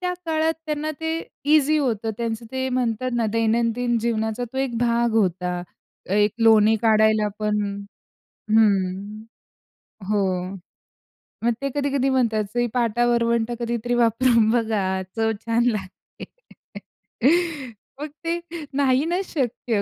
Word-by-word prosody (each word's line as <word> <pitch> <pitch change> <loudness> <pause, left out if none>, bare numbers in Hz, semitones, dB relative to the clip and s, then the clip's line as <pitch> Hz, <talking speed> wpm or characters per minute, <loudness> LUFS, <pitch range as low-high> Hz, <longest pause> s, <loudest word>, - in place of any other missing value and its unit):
त्या 360 0 -1
काळात 320 0 +1
त्यांना 305 0 -2
ते 320 0 -1 0.4
ईझी 310 0 +4
होतं, 225 -6 -1
त्यांचं 230 -1 -3
ते 260 0 -1
म्हणतात 250 -1 -1
ना, 235 -2 +1
दैनंदिन 230 +1 +1
जीवनाचा 220 +1 -1
तो 265 - -4
एक 265 -3 -1
भाग 235 0 +1
होता. 180 -4 0 0.5
एक 205 +1 +3
लोणी 220 -1 +5
काढायला 220 -1 +4
पण 210 0 0 0.9
हं, 205 -1 +1 0.9
हो. 190 -2 0 0.9
मग 235 +1 +2
ते 275 - -1
कधी-कधी 280 -2 0
म्हणतात, 230 -5 +1
सई, 240 0 +1
पाटा-वरवंटा 235 0 +1
कधीतरी 235 0 -2
वापरून 230 -1 +3
बघा, 210 -5 0
चव 225 0 +1
छान 230 +1 +2
लागते. 205 -6 -4 1.7
मग 300 - -4 0.2
ते 335 +1 0 0.3
नाही 270 0 +2
नाच 355 +4 -1
शक्य. 240 -6 -1
235 Hz, 120 wpm, -23 LUFS, 215-255 Hz, 1.7 s, लोणी